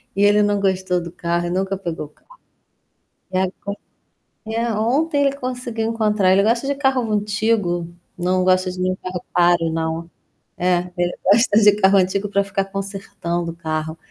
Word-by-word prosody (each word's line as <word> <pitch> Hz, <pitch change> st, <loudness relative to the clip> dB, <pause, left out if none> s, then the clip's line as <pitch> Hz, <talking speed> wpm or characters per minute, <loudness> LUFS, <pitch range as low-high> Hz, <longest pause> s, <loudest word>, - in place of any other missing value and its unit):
e 200 Hz, -, +2 dB
ele 205 Hz, +1 st, +5 dB
não 205 Hz, -1 st, +1 dB
gostou 185 Hz, -2 st, 0 dB
do 170 Hz, 0 st, -7 dB
carro 175 Hz, 0 st, -2 dB
e -, -, -3 dB
nunca 190 Hz, +2 st, -1 dB
pegou 170 Hz, -5 st, -5 dB
o -, -, -14 dB
carro. -, -, -23 dB, 0.9 s
E 185 Hz, -, 0 dB
agora 185 Hz, 0 st, 0 dB, 0.9 s
é, 230 Hz, +1 st, -1 dB
ontem 285 Hz, +8 st, +1 dB
ele 275 Hz, 0 st, +1 dB
conseguiu 250 Hz, -4 st, -3 dB
encontrar 210 Hz, -4 st, +2 dB
ele 195 Hz, +1 st, +4 dB
gosta 235 Hz, +5 st, +1 dB
de 280 Hz, -, 0 dB
carro 265 Hz, -5 st, +1 dB
antigo, 210 Hz, -4 st, 0 dB, 0.3 s
não 185 Hz, +1 st, 0 dB
gosta 185 Hz, 0 st, +3 dB
de 185 Hz, -, -8 dB
nenhum 185 Hz, 0 st, 0 dB
carro 185 Hz, -1 st, -6 dB
caro, 175 Hz, -2 st, +3 dB
não. 165 Hz, +1 st, -3 dB, 0.5 s
É, 180 Hz, 0 st, 0 dB
ele 175 Hz, 0 st, 0 dB, 0.2 s
gosta 225 Hz, -1 st, +5 dB
de 210 Hz, -1 st, +7 dB
carro 195 Hz, -1 st, +4 dB
antigo 195 Hz, +2 st, 0 dB
pra 200 Hz, 0 st, +2 dB
ficar 195 Hz, 0 st, -2 dB
consertando 195 Hz, -4 st, -4 dB
o -, -, -12 dB
carro. 160 Hz, -1 st, -4 dB
195 Hz, 175 wpm, -21 LUFS, 175-215 Hz, 0.9 s, de